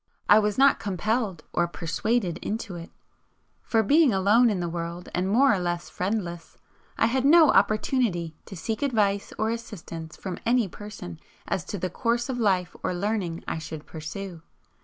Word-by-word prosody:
I 210 - +8
was 210 -1 0
not 275 +1 +5
compelled 205 -2 -1
or 175 - +2
persuaded 175 +2 -1
into 215 -2 -4
it, 170 -1 -8 0.7
for, 225 -1 +1
being 295 +5 +5
alone 210 +5 +4
in 200 -4 -1
the 175 - -2
world 170 +1 -5
and 185 +2 0
more 240 +3 +5
or 195 - 0
less 175 -1 -3
friendless, 180 -3 -3 0.4
I - - +4
had 250 +3 +1
no 315 +1 +7
opportunity 200 - +1
to 195 - -8
seek 220 +5 -3
advice 210 -7 +1
or 220 +1 0
assistance 165 -8 -7
from 185 -3 -5
any 235 -2 +2
person 195 - -9 0.3
as 180 - -1
to 205 - -4
the 185 -1 -3
course 235 +5 0
of 250 -2 -2
life 185 -5 +1
or 180 - -1
learning 185 -3 -2
I - - -2
should 155 -1 -7
pursue. 170 +2 -7
200 Hz, 170 wpm, -26 LUFS, 175-225 Hz, 0.7 s, I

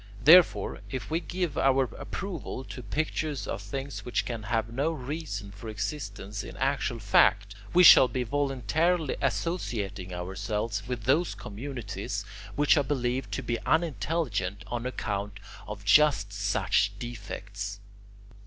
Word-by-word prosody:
Therefore, 170 +4 +6
if 130 +2 -5
we 160 - +2
give 175 -4 -3
our 135 0 +4
approval 175 -9 -5
to 125 - -8
pictures 150 +4 -2
of - - -4
things 140 0 -5
which 125 - -1
can 115 -3 -4
have 110 +1 -1
no 140 +6 +1
reason 135 -8 -5
for 100 +3 -9
existence 105 -2 -4
in - - -9
actual 135 -3 0
fact, 100 -1 +3 0.2
we 180 - +6
shall 130 - +10
be 125 +1 -2
voluntarily 145 - 0
associating 105 - -2
ourselves 100 +4 -3
with 125 -3 -4
those 145 +3 +2
communities 100 -2 -5 0.3
which 145 +2 +4
are 145 - +3
believed 125 -4 -1
to - - -2
be 120 -1 -1
unintelligent 125 - 0
on 120 +2 -3
account 100 -4 -3 0.3
of 100 -1 -7
just 105 -5 +4
such 100 0 +1
defects." 100 -3 -6
120 Hz, 135 wpm, -28 LUFS, 100-145 Hz, 0.3 s, shall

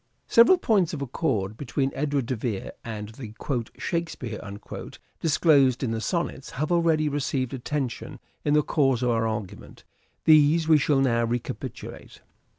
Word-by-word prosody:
Several 235 +11 +6
points 200 - +1
of 140 - -7
accord 110 -7 -1
between 135 +1 -1
Edward 140 -2 -1
de 130 - -2
Vere 110 -3 -4
and 105 -2 -6
the 110 -1 -10 0.4
" - - -29
Shakespeare 165 - -3 0.4
" - - -16
disclosed 140 -5 +3
in 120 - 0
the 115 -1 -2
Sonnets 170 -2 -2
have 155 +5 -1
already 165 -3 +3
received 135 -3 -1
attention 135 -1 -4 0.3
in 145 0 +2
the 150 - +4
course 135 -5 +1
of 125 - +2
our 115 -1 +1
argument; 105 -2 -6 0.4
these 155 +1 +5
we 155 -2 +6
shall 140 -1 +2
now 115 -3 +2
recapitulate. 120 +1 -6
135 Hz, 155 wpm, -26 LUFS, 115-155 Hz, 0.4 s, Several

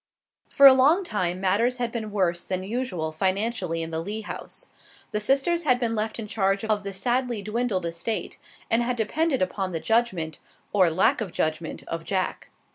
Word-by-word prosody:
For 280 - +5
a 270 - +12
long 290 +9 +4
time 185 - -2
matters 210 +7 +2
had 240 -1 -2
been 225 -2 -4
worse 180 -4 0
than 185 0 -3
usual 195 -7 -3
financially 185 0 -1
in 165 - -6
the 160 - -2
Lee 210 +5 -4
house. - - -7 0.4
The 210 - 0
sisters 275 +10 +2
had 250 -6 +2
been 235 -2 0
left 220 0 -2
in 225 - -5
charge 195 -1 0
of 215 -2 +1
the 200 0 -5
sadly 240 +2 -1
dwindled 215 -3 -1
estate, 170 +7 -3 0.3
and 230 - +2
had 245 +1 0
depended 265 - +1
upon 185 0 -3
the 165 - -1
judgment, 185 -8 0 0.3
or 185 -4 +5
lack 175 +7 +2
of 200 -5 -3
judgment, 155 0 -2
of 165 0 -4
Jack. 190 +1 -2
210 Hz, 185 wpm, -25 LUFS, 185-240 Hz, 0.4 s, a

